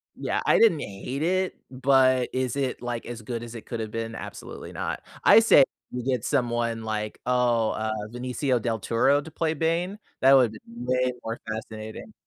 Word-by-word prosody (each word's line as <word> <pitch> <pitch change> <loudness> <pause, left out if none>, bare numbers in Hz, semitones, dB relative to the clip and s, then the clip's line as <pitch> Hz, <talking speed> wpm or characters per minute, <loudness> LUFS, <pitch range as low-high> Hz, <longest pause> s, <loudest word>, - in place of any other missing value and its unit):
Yeah. - - -2
I - - +5
didn't 195 -10 +5
hate 125 +9 -5
it, 185 +2 +1 0.2
but 130 -1 +3
is 130 0 -1
it, 135 -3 -2
like, 120 -1 -4
as 120 -1 -7
good 115 +1 -5
as 120 0 -8
it 115 - -8
coulda 115 -2 -4
been? 115 +1 -5
Absolutely - - -8
not. - - -4 0.2
I - - +8
say 225 -11 +7 0.3
you 125 -1 -4
get 125 -3 0
someone 120 -4 0
like, 105 -1 -3
oh, 120 -3 +2
uh, 110 0 -2 0.2
Benicio 125 0 -1
Del 115 -2 -1
Toro 135 +8 +2
to 160 +2 -11
play 160 0 0
Bane? 165 +5 -1 0.2
That 135 +1 +7
would 125 -4 +6
be 110 - -11
way 125 +2 -1
more 115 +1 -4
fascinating. 110 - -7
125 Hz, 180 wpm, -26 LUFS, 115-135 Hz, 0.3 s, I